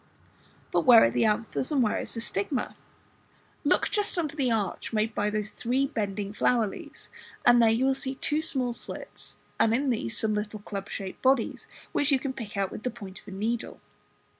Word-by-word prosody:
But - - +3
where 240 -3 +8
are 115 - +4
the 120 - +2
anthers, 225 +5 0
and 275 -4 +3
where 215 - +1
is - - -6
the 230 - -3
stigma? 230 +4 -2 0.9
Look - - +2
just 415 -3 0
under 310 -4 -1
the 270 -4 +1
arch 220 -4 -1
made 220 0 0
by 210 0 0
those 215 0 -2
three 255 +4 0
bending 205 -6 -3
flower 235 +1 +2
leaves, 200 - -9 0.3
and 240 -1 +7
there 230 - +6
you 230 +4 +2
will 270 - +4
see 265 0 -4
two 300 +3 -1
small 260 -6 +1
slits, - - -8 0.2
and 225 0 +4
in 270 +1 +1
these 115 - -1
some 220 -1 +2
little 210 0 -3
club 200 -1 -6
shaped 190 -1 -6
bodies, 260 -3 +1 0.2
which 290 +1 +2
you 275 - +5
can 265 0 -4
pick 220 -6 -7
out 195 -1 0
with - - -7
the 250 - -1
point 195 -5 -10
of - - -28
a - - -8
needle. 220 +5 -3
225 Hz, 205 wpm, -27 LUFS, 210-260 Hz, 0.9 s, where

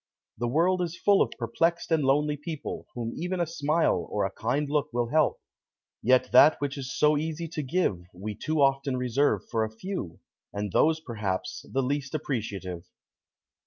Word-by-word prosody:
The 120 - 0
world 175 +8 +2
is 170 -1 -3
full 200 -1 +4
of - - +3
perplexed 165 +10 0
and 160 -2 +3
lonely 145 +2 +2
people 150 +1 -6
whom 115 -1 -3
even 180 +2 -3
a 175 - +2
smile 160 0 +1
or 105 - 0
a 95 - -2
kind 135 +9 -1
look 145 -1 0
will 120 -1 -1
help. 155 +2 +2 0.6
Yet 130 +2 +3
that 145 +5 +7
which 145 -1 -2
is 135 -2 -5
so 150 0 +4
easy 160 +2 -3
to 155 - -3
give 135 - 0
we 100 +4 -6
too 155 +7 -1
often 135 -1 +2
reserve 125 +3 +1
for 115 -2 +1
a 110 - -2
few, 110 - -6 0.3
and 100 -1 -3
those 160 - +3
perhaps 95 -9 -4
the 135 0 +1
least 140 +1 -2
appreciative. 100 - -4
140 Hz, 175 wpm, -27 LUFS, 115-155 Hz, 0.6 s, that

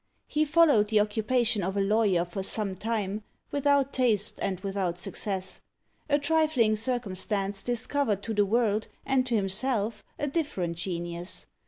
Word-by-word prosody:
He 305 0 +1
followed 295 -9 +5
the 215 0 +3
occupation 220 +1 +1
of 190 +2 -2
a - - +2
lawyer 195 -3 +2
for 175 +3 -5
some 200 0 -2
time, 210 0 -2 0.3
without 285 -1 +2
taste 225 -6 +1
and 190 -2 -1
without 195 -3 -2
success. 190 +1 -3 0.5
A 290 - +4
trifling 290 -7 +2
circumstance 205 -4 -1
discovered 245 -3 0
to 225 - -3
the 205 -1 +3
world 220 -1 +1 0.2
and 260 -1 +2
to 240 - +1
himself 210 +2 0
a - - -1
different 280 - -2
genius. 175 0 -4
215 Hz, 145 wpm, -28 LUFS, 195-255 Hz, 0.5 s, followed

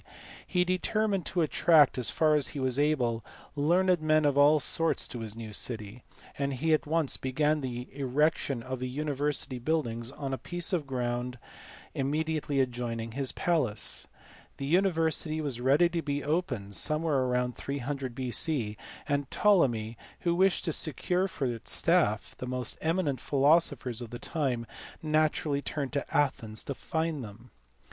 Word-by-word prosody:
he 180 -2 +2
determined 195 +1 0
to 180 - 0
attract, 155 -1 +5
as 125 -3 0
far 155 -1 +3
as 150 -2 +3
he - - -2
was 130 0 +1
able, 125 -6 +1 0.3
learned 175 +4 +3
men 155 0 +3
of 145 -2 +3
all 145 +2 +6
sorts 165 +3 +2
to 120 - -7
his 110 -2 -5
new 110 -2 -7
city; 110 +1 -3 0.4
and 140 0 0
he 155 +5 +1
at 155 - +1
once 160 -2 +1
began 150 +3 +1
the 125 -2 -4
erection 140 -2 0
of 130 0 -5
the 130 0 -3
university 145 -1 -2
buildings 120 -4 -1
on 135 -2 -4
a 130 - -3
piece 175 +1 -3
of 160 -6 0
ground 125 -1 -2 0.6
immediately 150 +1 -1
adjoining 120 -3 -2
his 135 +2 -1
palace. 140 -12 -1 0.5
The 135 - -4
university 160 -2 +1
was 140 -6 -3
ready 140 +7 +5
to 170 -1 -2
be 145 -1 -2
opened 130 - -2
somewhere 155 - +1
about 125 0 0
300 140 -2 -4
B.C., 125 -3 -1 0.3
and 145 -2 -1
Ptolemy, 120 - +2 0.2
who 170 - +1
wished 190 +2 +2
to 165 - 0
secure 180 +5 +1
for 145 -7 -3
its 120 -3 -2
staff - - +2
the 125 - -5
most 125 -1 -3
eminent 160 -5 0
philosophers 140 -4 +2
of 120 - -6
the 120 - -6
time, 130 -6 -2 0.4
naturally 155 -2 +1
turned 145 -2 -4
to 140 - -2
Athens 115 -7 0
to 140 - -4
find 160 0 -2
them. 115 +3 -12
140 Hz, 155 wpm, -29 LUFS, 125-155 Hz, 0.6 s, all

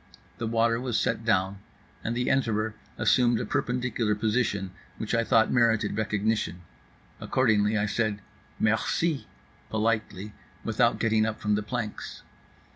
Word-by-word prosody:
The 115 - -2
water 115 +1 +2
was 125 -3 0
set - - 0
down, 95 -3 +1 0.4
and 115 +1 -2
the 125 - 0
enterer 110 -4 +1 0.2
assumed 120 -3 +3
a - - -2
perpendicular 125 -3 0
position 105 -3 0 0.3
which 110 - -4
I 115 0 +3
thought 110 -1 +3
merited 115 -3 +2
recognition; 105 -4 -1 0.6
accordingly 110 -4 +2
I 105 - +1
said 105 -1 -1 0.4
"Merci" 135 +8 +1 0.4
politely, 110 -2 -1 0.3
without 115 +2 +2
getting 110 -1 +2
up 110 - -4
from 105 -1 0
the 105 - +1
planks. 110 0 -5
110 Hz, 130 wpm, -27 LUFS, 105-120 Hz, 0.6 s, assumed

